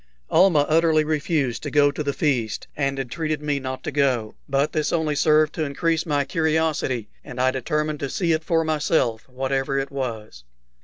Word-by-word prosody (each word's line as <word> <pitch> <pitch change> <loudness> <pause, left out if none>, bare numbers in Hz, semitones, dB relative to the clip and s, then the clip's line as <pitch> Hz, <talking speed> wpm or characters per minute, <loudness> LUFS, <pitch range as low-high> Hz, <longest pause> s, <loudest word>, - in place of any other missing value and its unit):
Almah 165 -4 +5
utterly 160 -1 +3
refused 150 -4 -1
to - - -4
go 145 -1 +4
to 150 - -5
the 145 -1 0
feast, 125 -8 -1
and 135 -1 -1
entreated 155 +4 -2
me 145 -1 0
not 130 -1 -5
to - - -3
go; 130 -7 +1 0.2
but 140 +2 +1
this 155 -2 0
only 160 -3 0
served 155 +1 +3
to 160 - -2
increase 165 +3 -1
my 145 -2 +1
curiosity, 155 - 0 0.2
and 125 - -9
I 130 +1 +3
determined 150 +3 -2
to 140 - -3
see 170 +2 0
it 160 0 +1
for 165 0 +1
myself, 150 -7 0
whatever 135 +1 -1
it 135 0 -2
was. 110 - -5
145 Hz, 185 wpm, -23 LUFS, 135-155 Hz, 0.2 s, Almah